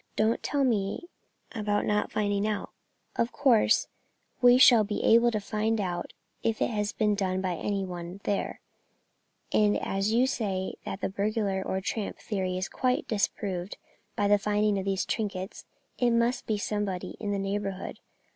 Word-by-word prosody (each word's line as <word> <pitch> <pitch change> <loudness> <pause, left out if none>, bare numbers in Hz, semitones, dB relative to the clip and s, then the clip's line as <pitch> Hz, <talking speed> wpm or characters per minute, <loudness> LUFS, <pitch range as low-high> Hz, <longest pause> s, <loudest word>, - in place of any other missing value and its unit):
Don't 220 +2 +2
tell 285 -1 0
me 230 - 0 0.4
about 210 -3 -1
not 210 0 0
finding 205 -1 0
out; 210 -1 -3 0.5
of 235 +1 +1
course 255 -5 +3 0.5
we 245 0 +7
shall 245 -3 +8
be 205 0 -3
able 235 +1 +6
to 215 -2 -1
find 215 +2 -1
out 175 -3 -3 0.3
if 225 -1 0
it - - +1
has 210 -1 -1
been 210 -2 +1
done 190 -2 -1
by 185 -1 -1
any 195 +3 -2
one 175 -1 -6
down 200 - -12
there; 200 - -2 0.9
and 210 -1 +4
as 195 +2 -1
you 240 +3 +4
say 200 -8 -2
that 195 - -5
the - - 0
burglar 200 -1 -1
or 190 0 -2
tramp 205 +2 -3
theory 185 -3 -2
is 185 - -2
quite 255 -1 0
disproved 195 -3 -2 0.4
by 205 -2 +1
the 205 0 +5
finding 210 0 +1
of 190 - -4
these 195 -1 0
trinkets, 200 -4 -3 0.3
it 245 - +3
must 235 +2 +1
be 215 - +1
somebody 205 -3 -3
in 210 - -3
the 200 - 0
neighbourhood. 195 -1 -3
205 Hz, 170 wpm, -28 LUFS, 195-225 Hz, 0.9 s, shall